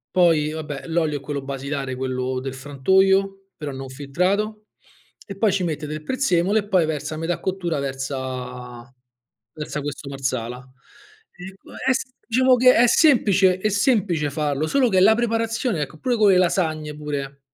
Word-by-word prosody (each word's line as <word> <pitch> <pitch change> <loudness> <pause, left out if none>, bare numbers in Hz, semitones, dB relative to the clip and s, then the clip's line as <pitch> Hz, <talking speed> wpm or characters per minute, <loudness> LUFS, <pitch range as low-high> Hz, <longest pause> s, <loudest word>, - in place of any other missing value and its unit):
Poi 165 -4 +3
vabbè, 150 -3 -6
l'olio 160 -3 0
è - - -7
quello 140 0 -5
basilare, 135 0 -4
quello 130 0 -2
del 135 0 -5
frantoio, 190 +8 +1
però 150 -2 -5
non 135 0 -7
filtrato, 190 +11 -2 0.6
e 195 -2 -8
poi 210 0 +3
ci 185 -1 0
mette 155 -2 -3
del 155 +1 -6
prezzemolo 200 - +1
e 205 -1 -2
poi 185 -4 +3
versa 155 0 -3
a - - -6
metà 165 +2 -2
cottura, 180 -5 -2
versa 130 -2 -5 0.6
versa 150 -1 -5
questo 145 0 -6
Marsala. 130 -3 -3 0.8
Ehm, 190 +1 -10
può - - -15 0.2
es 265 - +2 0.2
diciamo 255 +2 +4
che 255 +1 +6
è 240 +1 +5
semplice 200 - +4
è 215 - 0
semplice 200 - +1
farlo, 145 +1 -1
solo 265 - +3
che 190 -5 +2
è - - +4
la 220 +3 +6
preparazione, 230 - -1
ecco, 150 +2 -5
pure 250 +6 0
con 215 -3 +4
le 190 - +5
lasagne, 160 -4 0
pure. 140 -2 -5
160 Hz, 170 wpm, -22 LUFS, 140-195 Hz, 0.8 s, che